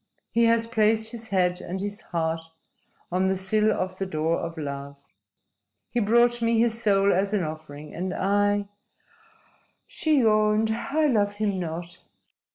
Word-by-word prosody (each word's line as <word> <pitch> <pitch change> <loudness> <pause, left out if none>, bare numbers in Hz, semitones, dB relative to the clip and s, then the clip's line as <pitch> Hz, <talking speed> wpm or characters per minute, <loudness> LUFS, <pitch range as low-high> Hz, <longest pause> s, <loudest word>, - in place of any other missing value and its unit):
"He 235 0 +3
has 230 0 +3
placed 220 -1 +1
his 230 -2 -8
head 180 -2 +1
and 180 +2 -5
his 205 +1 -4
heart 165 -1 -2 0.7
on 185 +2 +1
the 190 - +1
sill 210 +3 +2
of 185 -2 -3
the 195 - -2
door 160 -1 0
of 165 0 -5
love. 140 -1 -6 0.9
He 240 - 0
brought 235 +2 +3
me 230 0 +2
his 230 0 +1
soul 200 -2 +3
as 195 +3 +1
an 195 - +1
offering. 155 -1 -7
And 185 +2 -3
I" 205 +1 +1 1.2
she 315 - +1
yawned 215 0 +3
"I 280 +7 0
love 205 -7 +2
him 205 -2 -1
not." 170 0 -5
205 Hz, 155 wpm, -25 LUFS, 180-225 Hz, 1.2 s, He